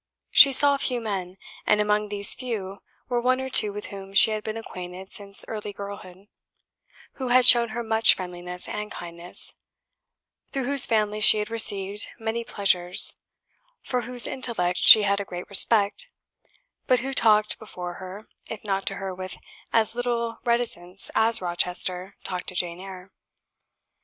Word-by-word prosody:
She 275 - +7
saw 280 +1 +5
few 250 -3 -2
men; 190 -5 -7 0.3
and 210 - +2
among 210 0 -1
these 200 -1 +2
few 205 -6 -7 0.3
were 245 -2 -3
one 255 +1 0
or 265 0 -7
two 210 - +7
with 205 +1 -9
whom 195 0 -11
she 220 - +5
had 215 -1 -5
been 220 +1 -6
acquainted 185 -3 -10
since 200 -1 +4
early 210 -2 -7
girlhood, 200 -2 -11 1.0
who 260 - -4
had 250 0 +2
shown 235 -2 +6
her 235 +2 -6
much 220 0 +3
friendliness 180 0 -7
and 210 0 -7
kindness, 170 0 -4 1.0
through 270 -2 -4
whose 275 +1 +6
family 215 -2 -2
she 215 0 +6
had 210 +1 -5
received 205 -2 +1
many 230 0 -5
pleasures, 185 -5 +3 0.6
for 250 -1 -3
whose 245 0 0
intellect 220 -9 -2
she 215 - +7
had 200 0 -1
a - - -5
great 180 -2 -10
respect, 210 - +2 0.8
but 255 -3 +1
who 270 +2 -6
talked 215 -4 +1
before 180 -5 -9
her, 190 +3 -11 0.2
if 220 - -9
not 195 -2 -4
to - - -2
her 195 -1 -7
with 185 0 -9 0.3
as 225 -1 0
little 235 -1 -4
reticence 200 -6 0
as 225 -2 0
Rochester 180 +2 -2
talked 180 -1 -7
to 185 - -7
Jane 175 0 -4
Eyre. 190 0 -12
210 Hz, 160 wpm, -23 LUFS, 185-230 Hz, 1.0 s, She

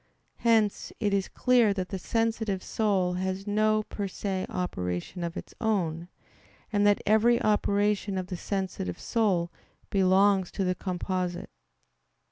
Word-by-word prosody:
Hence 225 -3 +2
it 205 -3 0
is 195 -1 +1
clear 240 -5 +3
that 185 -2 -3
the 190 - -4
sensitive 225 -3 -1
soul 195 -5 +1
has 190 +1 -3
no 215 +1 +2
per 205 -1 -4
se 190 0 -3
operation 90 - -3
of 170 0 -4
its - - -8
own, 175 -7 0 0.7
and 205 0 +3
that 205 - +3
every 225 +3 +4
operation 205 -1 +1
of 185 - -2
the 180 - -5
sensitive 185 - -3
soul 190 -7 +1 0.4
belongs 190 0 +4
to 195 - -1
the 180 -1 +1
composite. 180 0 -3
195 Hz, 135 wpm, -28 LUFS, 185-210 Hz, 0.7 s, every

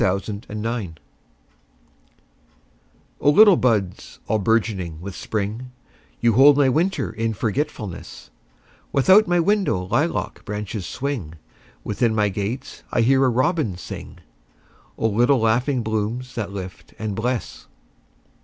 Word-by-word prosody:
A 95 +1 +2
Song 100 +1 -6
in 105 0 -5
Spring 110 -8 -3 2.2
O - - +3
LITTLE 205 +5 +7
buds 105 - -1
all 110 - +1
bourgeoning 100 -6 0
with 95 +2 -7
Spring, 110 +4 -4 0.5
You 120 -1 +3
hold 140 +4 +7
my 140 -2 +4
winter 170 +8 0
in 115 0 -2
forgetfulness; 110 - -4 0.6
Without 190 +10 +5
my 175 0 +2
window 190 - +1
lilac - - -1
branches 105 -1 -5
swing, 125 - -4 0.5
Within 110 +1 0
my 105 -1 +2
gate 100 +6 -5
I 120 - +2
hear 135 +3 +4
a 130 - +4
robin 130 - 0
sing—O - - -9
little 120 +6 +3
laughing 120 +3 +1
blooms 110 +4 -3
that 105 -5 -4
lift 95 -2 -9
and 110 -2 -3
bless! 120 +3 -3
110 Hz, 125 wpm, -22 LUFS, 100-130 Hz, 2.2 s, LITTLE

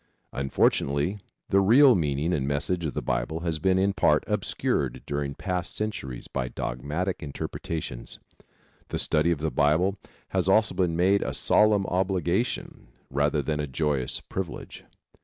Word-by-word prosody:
Unfortunately, 70 +6 +1 0.3
the 100 - +4
real 125 +7 +7
meaning 75 -2 0
and 70 -5 -1
message 80 +5 -1
of 70 - -6
the - - -2
Bible 80 +7 -2
has 85 -2 -2
been 95 +1 +2
in 100 +1 +2
part 85 - +3
obscured - - -1
during 70 -1 -3
past 90 +1 -3
centuries 105 - -4
by 65 -2 -3
dogmatic 75 +12 -3
interpretations. 75 -2 -5 0.7
The - - -3
study 75 +2 +2
of 85 -4 0
the 80 -1 -1
Bible 85 +7 +2 0.3
has - - 0
also 110 -2 +4
been 90 -3 0
made 95 +4 +3
a - - -2
solemn 105 -2 +3
obligation 95 - -1 0.2
rather 70 +1 +1
than 75 +2 -2
a 75 - -2
joyous 70 -2 -1
privilege. 95 -3 -6
80 Hz, 145 wpm, -26 LUFS, 70-95 Hz, 0.7 s, real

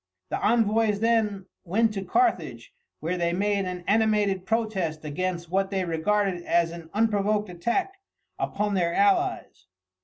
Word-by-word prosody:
The - - -2
envoys 220 -2 +2
then 215 -4 +1 0.2
went 215 +5 +1
to 195 -2 -4
Carthage, 370 - 0 0.3
where 175 +3 -2
they 170 0 +1
made 200 +1 0
an 180 -1 -5
animated 205 -3 +2
protest 195 -9 -1
against 175 +2 -3
what 195 +1 +1
they 190 -2 -1
regarded 180 +2 0
as 170 -1 +2
an 170 -1 -10
unprovoked 210 -1 +1
attack 365 - -2 0.4
upon 205 0 -1
their 175 -3 +1
allies. 370 - +1
200 Hz, 140 wpm, -26 LUFS, 175-220 Hz, 0.4 s, envoys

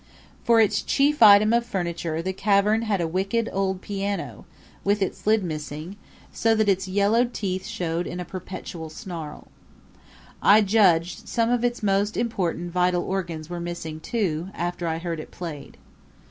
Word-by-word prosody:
For 230 -1 +4
its 210 -1 +3
chief 285 +4 +1
item 215 0 +8
of 235 0 +3
furniture 170 -6 -3
the 190 +1 -2
cavern 205 +2 +2
had 210 -5 0
a 165 - 0
wicked 195 +7 -1
old 190 -1 -1
piano, 200 0 -4 0.4
with 205 +1 +2
its 195 +1 -3
lid 215 -1 +4
missing, 155 +2 -5 0.4
so 225 0 +2
that 215 -1 +2
its 190 -1 +1
yellowed 210 +6 +2
teeth 190 -1 -3
showed 175 -6 -2
in 175 - -5
a 180 - -4
perpetual 175 -2 -7
snarl. 160 -2 -8 0.9
I 210 +2 +6
judged 190 -5 +2
some 230 0 +1
of 245 -1 +1
its 240 -1 -1
most 200 +1 +1
important 175 -7 -2
vital 180 0 +1
organs 170 -5 -4
were 175 0 -5
missing 170 -2 -5
too 180 -4 -2
after 175 0 -3
I 160 0 -1
heard 165 -1 -4
it - - -8
played. 160 -5 -8
190 Hz, 160 wpm, -24 LUFS, 170-215 Hz, 0.9 s, item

